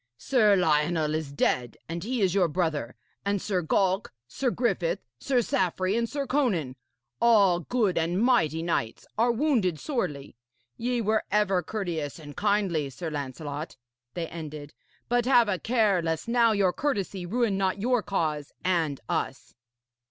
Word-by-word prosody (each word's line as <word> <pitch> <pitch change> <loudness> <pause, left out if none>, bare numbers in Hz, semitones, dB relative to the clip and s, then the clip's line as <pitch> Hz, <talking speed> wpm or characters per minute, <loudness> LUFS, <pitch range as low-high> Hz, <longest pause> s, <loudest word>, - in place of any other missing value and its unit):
Sir 215 - +3
Lionel 155 -2 +2
is 155 -3 -3
dead, 125 -3 0
and 170 +1 -4
he 245 +2 -2
is 185 -2 +2
your 190 -3 +3
brother; 155 -7 -2 0.3
and 200 0 0
Sir 185 -1 -1
Galk, 190 +4 +1 0.2
Sir 255 - -1
Griffith, 235 -9 0 0.2
Sir 250 - +1
Saffre 185 0 0
and 230 0 0
Sir 285 -1 -2
Conan 200 - 0 0.5
all 205 -7 +5
good 195 -1 0
and 170 +3 0
mighty 205 - +2
knights 120 -10 -2
are 235 +3 +3
wounded 230 - +1
sorely. 145 - -3 0.4
Ye 245 0 -1
were 220 0 +1
ever 195 -2 +2
courteous 170 -6 -4
and 145 -3 -10
kindly, 200 -8 +1
Sir 160 +5 -6
Lancelot,' 145 +2 -5 0.4
they 170 -2 -2
ended, 150 -3 -8 0.3
'but 245 0 +1
have 245 -4 +5
a 190 -3 0
care 220 -6 +2
lest 165 +3 -2
now 235 -1 +4
your 195 -4 +2
courtesy 200 -10 -2
ruin 230 0 +1
not 190 0 0
your 245 +2 +2
cause 155 -8 -2
and 165 -6 +1
us.' 130 - -3
185 Hz, 150 wpm, -27 LUFS, 160-225 Hz, 0.5 s, all